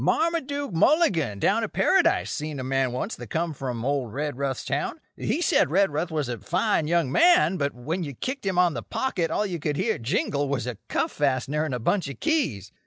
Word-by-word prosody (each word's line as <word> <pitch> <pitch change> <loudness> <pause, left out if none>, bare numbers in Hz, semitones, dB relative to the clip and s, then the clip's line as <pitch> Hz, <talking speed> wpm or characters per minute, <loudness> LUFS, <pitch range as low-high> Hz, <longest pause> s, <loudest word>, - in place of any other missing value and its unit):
Marmaduke 285 - 0
Mulligan, 165 - +3
down - - +2
at - - -4
Paradise, - - +3
seen 150 -2 -4
a - - -3
man 135 -1 0
once 130 - -3
that - - -9
come 165 0 -1
from 125 -4 -4
old 135 -5 -1
Redruth's 140 0 -3
town. - - -2 0.2
He - - -1
said - - +3
Redruth 170 -2 +1
was 155 -4 -2
a 120 -1 -4
fine 180 -3 0
young 165 -5 +1
man, 190 - +5
but 140 -4 -1
when 155 +9 -3
you 140 -4 -6
kicked 260 - -4
him 190 -2 -1
on 180 -2 +4
the 120 - -4
pocket 175 - -2
all 210 - 0
you 180 -4 -3
could 145 -1 -2
hear - - 0
jingle 140 +4 -1
was 135 -4 -1
a 120 -5 -5
cuff - - -1
fastener 145 +2 0
and 140 -5 -2
a - - -3
bunch 175 - 0
of 140 - -8
keys. 155 - 0
150 Hz, 210 wpm, -25 LUFS, 130-185 Hz, 0.2 s, man